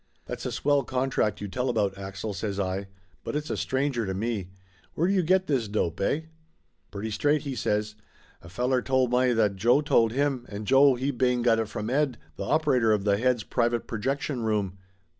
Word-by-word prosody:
"That's -, -, -5 dB
a -, -, -3 dB
swell 145 Hz, 0 st, +2 dB
contract 125 Hz, -6 st, -1 dB
you 105 Hz, -, -3 dB
tell 125 Hz, +6 st, -2 dB
about, 105 Hz, -5 st, 0 dB
Axel," 95 Hz, +2 st, -5 dB
says 100 Hz, +1 st, -3 dB
I. 95 Hz, 0 st, -2 dB, 0.4 s
"But -, -, -4 dB
it's 150 Hz, +1 st, -3 dB
a -, -, 0 dB
stranger 130 Hz, -3 st, -1 dB
to 95 Hz, -, -2 dB
me. 105 Hz, -3 st, -2 dB, 0.5 s
Where 170 Hz, -, +1 dB
do 195 Hz, -, +2 dB
you 190 Hz, -, +3 dB
get 185 Hz, +3 st, +2 dB
this 130 Hz, -, 0 dB
dope, 100 Hz, -5 st, -1 dB
eh?" 140 Hz, +10 st, +1 dB, 0.7 s
"Pretty 105 Hz, +2 st, -5 dB
straight," 145 Hz, +6 st, +1 dB
he 140 Hz, -, -4 dB
says. 105 Hz, -3 st, -1 dB, 0.5 s
"A 85 Hz, -, -12 dB
fellar 125 Hz, +6 st, 0 dB
told 130 Hz, -1 st, +1 dB
may 125 Hz, 0 st, +3 dB
that 105 Hz, -4 st, +1 dB
Joe 120 Hz, +8 st, +4 dB
told 115 Hz, -7 st, +3 dB
him, 135 Hz, -1 st, -1 dB
and 105 Hz, +1 st, -6 dB
Joe, 135 Hz, +2 st, +6 dB
he 130 Hz, +3 st, -1 dB
bane 125 Hz, -1 st, +1 dB
got 115 Hz, -2 st, +4 dB
it 110 Hz, -, -1 dB
from 110 Hz, +2 st, -4 dB
Ed, 140 Hz, -3 st, +1 dB, 0.2 s
tha 100 Hz, -, -5 dB
op 155 Hz, +9 st, +1 dB
erator 120 Hz, -6 st, +3 dB
of 100 Hz, -, -3 dB
tha 100 Hz, -1 st, +2 dB
head's 125 Hz, -2 st, +1 dB
private 120 Hz, +1 st, 0 dB
projection 130 Hz, +3 st, -2 dB
room. 105 Hz, -4 st, -1 dB
120 Hz, 205 wpm, -27 LUFS, 105-135 Hz, 0.7 s, Joe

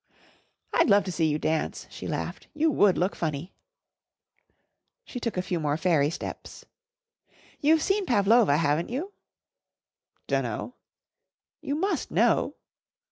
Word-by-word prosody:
"I'd -, -, +3 dB
love 205 Hz, 0 st, +5 dB
to 185 Hz, -, -4 dB
see 165 Hz, -2 st, +1 dB
you 150 Hz, -1 st, +1 dB
dance," 155 Hz, 0 st, -2 dB
she -, -, -7 dB
laughed. -, -, -4 dB
"You 310 Hz, +1 st, +2 dB
would 205 Hz, -8 st, +4 dB
look 180 Hz, +3 st, 0 dB
funny." 160 Hz, +2 st, -4 dB, 1.5 s
She 250 Hz, -, -6 dB
took 230 Hz, -4 st, -3 dB
a 180 Hz, -, 0 dB
few 180 Hz, -2 st, -2 dB
more 150 Hz, -1 st, 0 dB
fairy 160 Hz, -4 st, +2 dB
steps. 170 Hz, -, -7 dB, 0.9 s
"You've 315 Hz, +2 st, +3 dB
seen 390 Hz, 0 st, 0 dB
Pavlova, 210 Hz, -, +4 dB
haven't 150 Hz, +1 st, +1 dB
you?" 320 Hz, +12 st, -4 dB, 1.1 s
"Dunno." -, -, -2 dB, 0.9 s
"You 285 Hz, -, -2 dB
must 385 Hz, +6 st, -1 dB
know." -, -, +2 dB
190 Hz, 130 wpm, -27 LUFS, -, 1.5 s, love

